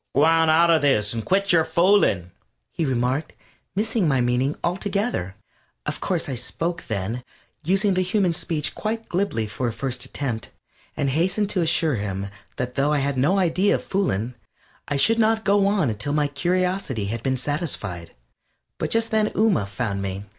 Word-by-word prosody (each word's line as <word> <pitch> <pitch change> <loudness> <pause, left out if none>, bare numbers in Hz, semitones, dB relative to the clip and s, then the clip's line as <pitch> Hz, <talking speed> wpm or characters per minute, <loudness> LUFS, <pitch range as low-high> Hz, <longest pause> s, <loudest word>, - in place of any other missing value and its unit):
"G'wan 160 +3 +4
out 170 +2 +5
of 160 -2 +4
this, 115 -8 +2
and 115 -1 -3
quit 200 - +1
yer 165 -2 +5
foolin'," 170 - +3 0.4
he 165 - -2
remarked, 130 +3 -1 0.4
missing 220 -2 +1
my 135 -3 +2
meaning 125 +4 +1
altogether. 190 - -1 0.5
Of - - -3
course 175 -3 -1
I 135 - -3
spoke 165 +8 -3
then, 110 +3 -3 0.4
using 195 +4 +2
the 185 - +2
human 185 -1 +1
speech 165 -3 -2
quite 225 +1 -3
glibly 175 - -1
for 110 +4 -3
a - - -1
first 125 +1 -3
attempt, 130 -4 -4 0.5
and 140 -3 0
hastened 185 +7 +1
to 185 - +1
assure 160 -4 +2
him 100 -1 -3 0.3
that 125 0 -3
though 140 +2 +1
I 150 - +2
had 140 0 0
no 145 +10 +2
idea 185 +2 +2
of - - -4
fooling, 125 - -1 0.5
I 145 - -1
should 225 +11 +3
not 220 0 +2
go 200 0 +4
on 195 - +2
until 125 +8 -2
my 150 -1 +2
curiosity 180 - -1
had 115 - -4
been 130 +2 0
satisfied. 125 - -4 0.6
But - - -1
just 225 0 +1
then 215 -1 +2
Ooma 200 - +2
found 100 0 -3
me. 100 +1 -4
150 Hz, 175 wpm, -23 LUFS, 125-190 Hz, 0.6 s, out